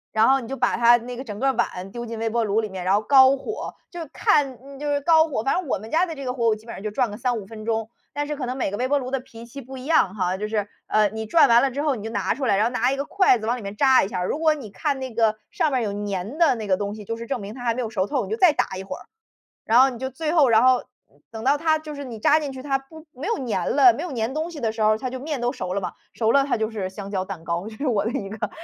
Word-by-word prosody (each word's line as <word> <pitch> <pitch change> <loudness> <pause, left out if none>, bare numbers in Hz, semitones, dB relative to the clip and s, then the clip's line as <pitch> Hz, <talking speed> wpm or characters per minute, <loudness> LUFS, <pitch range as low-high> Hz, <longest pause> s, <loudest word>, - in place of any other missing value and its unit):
然 220 +2 +5
后 270 +1 +4
你 235 - -8
就 270 - -4
把 - - +1
它 235 0 +6
那 240 +1 -5
个 260 - -6
整 210 -4 -7
个 270 +4 +2
碗 190 -6 -3
丢 240 +2 -6
进 230 -1 -6
微 225 0 -1
波 230 0 0
炉 210 +2 +1
里 215 - -4
面， 185 -2 -6
然 190 - +3
后 205 - +2
高 265 +3 +6
火， 425 +10 -6 0.2
就 350 - -7
看 275 -1 0
就 295 0 -3
是 285 0 0
高 320 +1 +5
火， 240 -8 -2
反 270 - +1
正 365 -3 -2
我 - - 0
们 220 +3 -11
家 335 +3 +3
的 330 -3 -6
这 275 - -7
个 250 - -2
火 240 -2 0
我 220 - +3
基 215 +1 -16
本 235 - -8
上 - - -8
就 215 - -3
转 235 +1 0
个 205 - -7
3-5 240 -4 -2
分 215 +1 -10
钟。 225 -1 -1 0.2
但 290 0 -2
是 300 - -3
可 270 - -3
能 250 +1 -3
每 255 -7 -2
个 205 - -3
微 255 - 0
波 285 +2 +2
炉 255 -2 -4
的 270 - 0
脾 235 -2 -12
气 240 +4 -10
不 265 0 -10
一 255 - -9
样 270 - +2
哈， 185 -2 -1
就 210 +2 -3
是， 210 -2 -2 0.2
呃， 215 -1 +3
你 220 +2 -5
转 315 +9 +5
完 235 0 +6
了 275 - +2
之 270 +3 -3
后 295 -3 +1
你 210 - -8
就 - - -3
拿 - - 0
出 270 +2 -4
来， 205 - +3
然 205 +2 +2
后 - - +2
拿 245 0 +1
一 - - -1
个 275 - -2
筷 375 -4 +3
子 220 - -6
往 240 +3 0
里 - - -8
面 200 0 -6
扎 265 +2 +5
一 - - -4
下， 180 -2 -3
如 240 - -2
果 315 -1 +4
你 275 -8 -8
看 290 +4 -1
那 260 -2 -5
个 220 -1 +2 0.2
上 310 - +1
面 260 -3 0
儿 - - -1
有 210 - -2 0.2
粘 200 +7 -4
的 325 -6 +4
那 220 -2 -5
个 190 -2 +2
东 205 +1 -3
西， 215 - -9
就 230 +3 -4
是 230 - -7
证 250 -1 -3
明 200 +1 -7
它 245 0 -8
还 235 - +2
没 250 - -3
有 230 - -3
熟 200 -4 -1
透， 270 -2 -1
你 195 - -8
就 220 - -1
再 345 +1 +5
打 190 - -1
一 190 - -6
会 195 - -6
儿。 - - -12 0.6
然 225 +2 +4
后 265 - +7
你 250 -3 -6
就 260 0 -3
最 305 +4 -3
后 305 -6 +5
然 220 0 +5
后 255 -1 +4 0.5
等 225 -1 -7
到 275 +3 +4
它 315 +1 +2
就 305 -1 -8
是 285 - -6
你 245 -5 -7
扎 300 +8 +4
进 290 -3 -4
去， 260 - -8
它 270 0 0
不 315 +4 -15
没 270 +9 -6
有 460 - 0
粘 190 -6 -1
了， 260 -4 +8
没 295 - -5
有 355 - -5
粘 235 +1 -2
东 315 +3 -2
西 330 - -9
的 225 -2 0
时 220 0 -3
候， 215 0 +4
它 255 - -3
就 260 0 -6
面 290 -1 -4
都 240 +1 0
熟 185 -9 -5
了 200 - -1
嘛。 185 - -4 0.2
熟 225 -1 +1
了 280 - +5
它 280 - 0
就 220 -1 -1
是 200 -4 -4
香 200 +1 -8
蕉 190 -2 -1
蛋 185 -4 -8
糕， 170 +4 -3
这 220 - -11
是 285 - -3
我 215 -6 +1
的 225 - -1
一 200 -4 -3
个 210 +1 -4
240 Hz, 365 characters per minute, -23 LUFS, 215-275 Hz, 0.6 s, 了